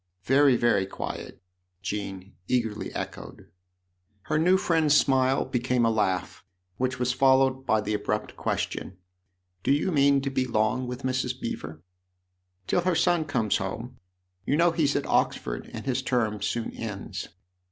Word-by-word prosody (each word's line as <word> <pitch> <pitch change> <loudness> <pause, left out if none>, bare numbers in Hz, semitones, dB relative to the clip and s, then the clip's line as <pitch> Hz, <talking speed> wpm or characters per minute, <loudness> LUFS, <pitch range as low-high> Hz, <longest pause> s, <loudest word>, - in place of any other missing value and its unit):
" 90 +1 -50
Very, 135 +5 +5
very 120 -5 +2
quiet," 95 - -7 0.4
Jean 100 -2 -5
eagerly 115 -4 -1
echoed. - - -7 0.7
Her 155 +5 0
new 180 +4 +4
friend's 160 -5 +3
smile 135 -1 +3
became 125 -1 +1
a 115 - +3
laugh, 95 -4 -1 0.3
which 130 0 -1
was 125 0 0
followed 130 0 +3
by 110 -1 +3
the 105 +1 -2
abrupt 105 0 -2
question: 95 - -3 0.3
" 90 -1 -48
Do - - +2
you 145 +6 +2
mean 140 -2 +4
to 135 0 -2
be 130 -1 0
long 110 +2 0
with 125 +2 -6
Mrs. 130 0 -1
Beever? 80 -9 -6 0.4
" 90 +1 -49
"Till 175 - +1
her 180 0 +1
son 175 -2 +2
comes 115 -8 +1
home. 115 +6 -5 0.4
You 145 - +1
know 170 +1 +4
he's 155 -4 +1
at - - 0
Oxford, - - 0
and - - -7
his 130 -1 0
term 115 -5 0
soon 115 +3 -2
ends." 105 -4 -6
125 Hz, 160 wpm, -27 LUFS, 105-135 Hz, 0.7 s, Very